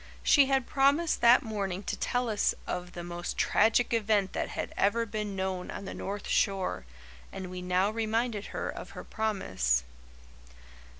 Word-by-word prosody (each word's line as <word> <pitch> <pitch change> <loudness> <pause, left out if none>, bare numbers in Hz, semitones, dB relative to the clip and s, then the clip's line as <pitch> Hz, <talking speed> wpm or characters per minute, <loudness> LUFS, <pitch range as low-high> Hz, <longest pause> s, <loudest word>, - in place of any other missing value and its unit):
She 280 -3 +6
had 270 -2 +2
promised 285 +5 +2
that 235 +1 +7
morning 200 -4 -3
to - - -2
tell 245 0 -1
us 215 -2 +1
of 180 0 -4
"the 175 - -6
most 175 0 -5
tragic 225 +3 +3
event 210 -4 +1
that - - -2
had - - -4
ever 230 +4 +2
been 210 -2 -4
known 190 -1 -3
on 200 - -6
the - - -6
north 200 0 -5
shore," 190 - 0 0.5
and 185 -1 -7
we 180 0 -6
now 180 +3 +1
reminded 225 -1 -1
her - - -4
of - - -6
her - - -6
promise. 95 - 0
205 Hz, 165 wpm, -29 LUFS, 185-230 Hz, 0.5 s, that